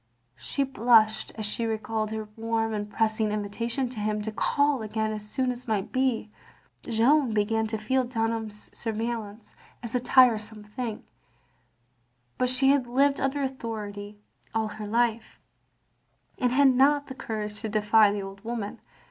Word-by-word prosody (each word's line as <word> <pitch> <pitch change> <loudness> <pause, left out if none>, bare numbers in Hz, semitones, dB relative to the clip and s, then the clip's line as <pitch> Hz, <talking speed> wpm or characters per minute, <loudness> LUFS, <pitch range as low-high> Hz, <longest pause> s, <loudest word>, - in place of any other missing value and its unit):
She 275 - -1
blushed 230 -4 +3
as 215 - -3
she 210 +3 -2
recalled 220 0 -2
her 220 0 -4
warm 225 0 -1
and 205 -1 -3
pressing 220 -1 +1
invitation 230 +5 -2
to 245 -3 -7
him 210 0 -1
to 220 - -3
call 285 +5 +1
again 220 0 -2
as 210 -1 -6
soon 255 +2 0
as 250 +1 -8
might 210 -3 -1
be. 255 -5 0 0.5
Jeanne 240 +1 +2
began 220 +1 +1
to 220 0 -2
feel 255 +5 +1
Dunham's 225 -3 -3
surveillance 225 -1 -4 0.3
a 235 +1 -1
tiresome 225 -4 +3
thing; 215 +1 -5 1.4
but 250 - +2
she 260 +2 +3
had 275 -3 +3
lived 275 +3 +2
under 275 +1 0
authority 210 -5 -5 0.4
all 220 -1 0
her 210 0 -7
life, 230 0 0 1.0
and 250 -2 +2
had 275 +2 +5
not 280 +3 +4
the 265 - -8
courage 210 -4 -4
to 220 - -3
defy 210 0 +4
the 205 -1 -3
old 195 0 -9
woman. 225 -3 -4
225 Hz, 150 wpm, -27 LUFS, 215-250 Hz, 1.4 s, had